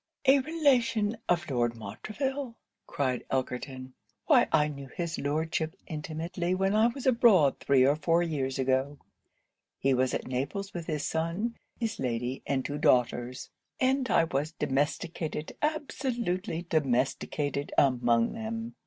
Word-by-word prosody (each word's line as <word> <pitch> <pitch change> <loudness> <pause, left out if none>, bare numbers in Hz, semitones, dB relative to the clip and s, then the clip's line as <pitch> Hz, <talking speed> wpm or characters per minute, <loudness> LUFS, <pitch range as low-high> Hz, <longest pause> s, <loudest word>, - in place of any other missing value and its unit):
'A 275 +1 +6
relation 250 -8 +2
of 175 -2 +2
Lord 120 -3 0
Montreville!' 230 - -4 0.3
cried 130 -3 -1
Elkerton; 130 0 -3 0.3
'why - - +5
I 150 - +4
knew 140 -2 -7
his 170 +4 -4
Lordship 155 +2 -1
intimately 165 +3 -3
when 195 +1 +1
I 220 +2 +5
was 245 +2 -5
abroad 230 - +5
three 135 -2 +4
or 140 +2 +4
four 165 +2 +2
years 140 -5 -2
ago. 135 +2 0 0.8
He 135 0 +2
was 130 0 +1
at - - -3
Naples 145 +11 -3
with 170 -2 -6
his 150 -3 -2
son, 170 +9 -1 0.2
his 225 -2 -2
lady, 125 +1 -2
and 135 -2 0
two 145 0 -3
daughters; 125 -1 +1 0.3
and 260 0 +2
I 165 - +4
was 155 0 -2
domesticated, 150 +3 -2
absolutely 240 - -2
domesticated, 140 0 0
among 120 -4 +3
them. 225 +1 -5
155 Hz, 135 wpm, -29 LUFS, 135-220 Hz, 0.8 s, A